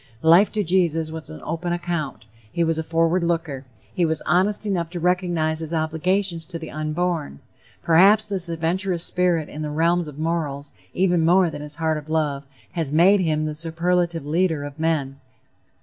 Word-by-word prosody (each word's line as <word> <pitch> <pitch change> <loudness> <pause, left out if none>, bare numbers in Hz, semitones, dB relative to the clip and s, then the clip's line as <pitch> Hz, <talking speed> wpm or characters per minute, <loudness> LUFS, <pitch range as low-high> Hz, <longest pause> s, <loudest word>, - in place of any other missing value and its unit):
Life, 170 +6 +6
to 210 -1 0
Jesus, 165 -3 +1
was 160 0 -8
an 80 - -9
open 170 +2 -3
account; 170 -9 -3 0.3
he 170 - 0
was 165 -1 0
a - - -2
forward 165 +2 +1
looker; 165 -6 -2 0.3
he 180 - 0
was 160 -2 0
honest 190 +6 +2
enough 175 -5 -1
to 175 0 -5
recognize 175 -3 0
his 165 +1 -3
obligations 165 +2 -1
to 175 - -5
the 160 -1 -8
unborn. 155 - -2 0.4
Perhaps 195 +6 +5
this 190 -4 -2
adventurous 170 +2 -1
spirit 175 -4 +1
in 150 - -8
the 150 - -3
realms 165 +2 +1
of 150 -2 -10
morals, 155 -3 -3 0.2
even 180 -3 +2
more 175 +1 +4
than 145 - -7
his 150 0 -5
heart 160 -1 0
of 150 +1 -14
love, 150 -3 -1 0.3
has 160 -5 -3
made 180 +6 +5
him 155 -3 0
the 155 - -3
superlative 170 0 -1
leader 160 -1 0
of 145 +1 -8
men." 150 -4 -1
165 Hz, 180 wpm, -23 LUFS, 155-175 Hz, 0.4 s, Life